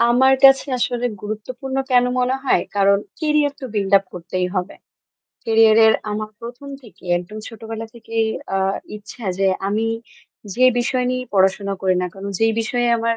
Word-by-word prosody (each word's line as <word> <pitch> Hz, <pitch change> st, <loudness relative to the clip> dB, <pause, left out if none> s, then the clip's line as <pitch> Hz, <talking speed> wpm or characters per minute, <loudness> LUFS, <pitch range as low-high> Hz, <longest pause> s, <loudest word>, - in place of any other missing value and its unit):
আমার 245 Hz, +3 st, +5 dB
কাছে 270 Hz, +1 st, +7 dB
আসলে 245 Hz, 0 st, -1 dB, 0.2 s
গুরুত্বপূর্ণ 245 Hz, +6 st, -5 dB
কেন 245 Hz, -1 st, +5 dB
মনে 250 Hz, +1 st, +1 dB
হয়? -, -, +3 dB
কারণ 200 Hz, 0 st, +4 dB, 0.2 s
career 300 Hz, -2 st, +2 dB
তো -, -, -7 dB
build 200 Hz, -2 st, -1 dB
up 195 Hz, -, -13 dB
করতেই 180 Hz, +1 st, -3 dB
হবে। 185 Hz, 0 st, -2 dB, 0.7 s
Career 225 Hz, -1 st, +5 dB
এর 220 Hz, -, +6 dB, 0.2 s
আমার 215 Hz, +1 st, -4 dB
১ম 240 Hz, +4 st, -9 dB
থেকে 205 Hz, -6 st, -17 dB
একদম 180 Hz, +5 st, -9 dB
ছোটবেলা 225 Hz, 0 st, -7 dB
থেকেই 225 Hz, -1 st, -2 dB, 0.2 s
অ্যা 195 Hz, -, -1 dB, 0.4 s
ইচ্ছা 215 Hz, +3 st, -11 dB
যে 195 Hz, -, +2 dB, 0.2 s
আমি 215 Hz, +2 st, 0 dB, 0.7 s
যে 255 Hz, -, +3 dB
বিষয় 250 Hz, +1 st, 0 dB
নিয়েই 255 Hz, 0 st, -3 dB
পড়াশোনা 195 Hz, +1 st, +2 dB
করি 190 Hz, -1 st, +2 dB
না -, -, 0 dB
কেন, 195 Hz, 0 st, -9 dB
যেই 225 Hz, 0 st, +3 dB
বিষয়ে 240 Hz, +2 st, 0 dB
আমার 230 Hz, 0 st, 0 dB
225 Hz, 165 wpm, -20 LUFS, 200-250 Hz, 0.7 s, কাছে